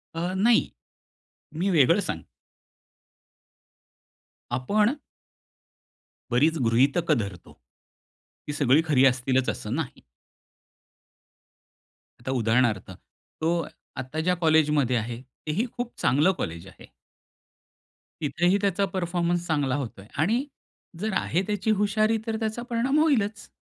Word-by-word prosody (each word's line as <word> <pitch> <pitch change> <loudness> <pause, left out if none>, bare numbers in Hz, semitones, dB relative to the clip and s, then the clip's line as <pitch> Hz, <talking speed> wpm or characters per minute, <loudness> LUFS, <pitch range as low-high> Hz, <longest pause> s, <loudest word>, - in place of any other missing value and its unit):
अ, 175 +3 -2
नाही. 225 +4 +3 0.9
मी 185 +5 0
वेगळं 145 -7 +5
सांग - - -4 2.3
आपण 210 - +1 1.4
बरीच 155 +7 +3
गृहीतक 140 +9 +2
धरतो. 100 - -2 0.9
ती 145 - -3
सगळी 145 +1 +4
खरी 135 -4 +4
असतीलच 130 0 +2
असं 105 +4 -3
नाही. 155 -4 -4 2.2
आता 130 +2 -4
उदाहरणार्थ 115 -5 +1
तो 160 - -6 0.5
आता 130 +5 -4
ज्या 180 +3 +1
कॉलेजमध्ये 150 -5 +3
आहे 115 +2 -4 0.3
तेही 185 +10 0
खूप 240 0 -4
चांगलं 150 +9 +4
कॉलेज 85 +3 -5
आहे. 95 - -14 1.4
तिथेही 175 +6 +2
त्याचा 200 0 +1
परफॉर्मन्स 175 -1 -1
चांगला 145 -5 +1
होतो 125 -8 -5
आहे. 100 - -16
आणि 240 +7 +1 0.5
जर 215 +1 -2
आहे 175 - 0
त्याची 210 +1 0
हुशारी 215 +2 +2
तर 225 - -1
त्याचा 220 +1 -2
परिणाम 255 +6 +1
होईलच. 220 -9 +1
160 Hz, 105 wpm, -26 LUFS, 130-200 Hz, 2.3 s, वेगळं